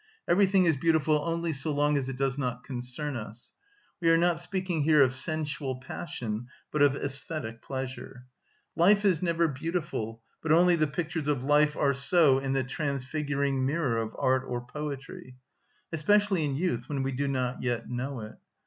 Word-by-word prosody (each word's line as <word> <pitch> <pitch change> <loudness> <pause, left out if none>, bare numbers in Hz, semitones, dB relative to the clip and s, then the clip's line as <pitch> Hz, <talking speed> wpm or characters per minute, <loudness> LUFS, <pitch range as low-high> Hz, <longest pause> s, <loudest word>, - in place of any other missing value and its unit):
Everything 190 0 +4
is 165 -3 +4
beautiful 155 0 +2
only 170 0 -1
so 140 +2 -2
long 145 +1 +2
as 135 -2 -1
it 130 - -5
does 135 -1 0
not 125 -3 -3
concern 130 +3 -3
us. 115 +1 -8 0.5
(We 165 - +3
are 165 - +6
not 170 0 +2
speaking 185 -2 -2
here 150 -1 +5
of 130 -1 +2
sensual 145 -1 -2
passion, 120 -4 -5 0.2
but 150 - 0
of 145 -2 +6
æsthetic 140 -4 -4
pleasure.) 130 -1 -6 0.5
Life 200 +5 +4
is 180 -6 +3
never 170 -2 +2
beautiful, 135 -7 -3 0.2
but 160 - -1
only 175 +2 +6
the 155 -2 +2
pictures 160 +1 -3
of 140 -4 0
life 150 +2 +3
are 140 -1 +3
so 140 -1 +4
in 135 0 -2
the 135 -1 +1
transfiguring 140 0 -2
mirror 135 -4 0
of 110 0 -6
art 130 0 +2
or 120 0 -4
poetry; 135 -2 -7 0.6
especially 195 +1 +2
in 140 -2 -1
youth, 130 -7 -1
when 140 -2 -1
we 135 - -1
do 140 +2 -1
not 130 -2 -1
yet 120 -2 -2
know 125 +1 -4
it. 110 0 -10
140 Hz, 175 wpm, -28 LUFS, 130-160 Hz, 0.6 s, are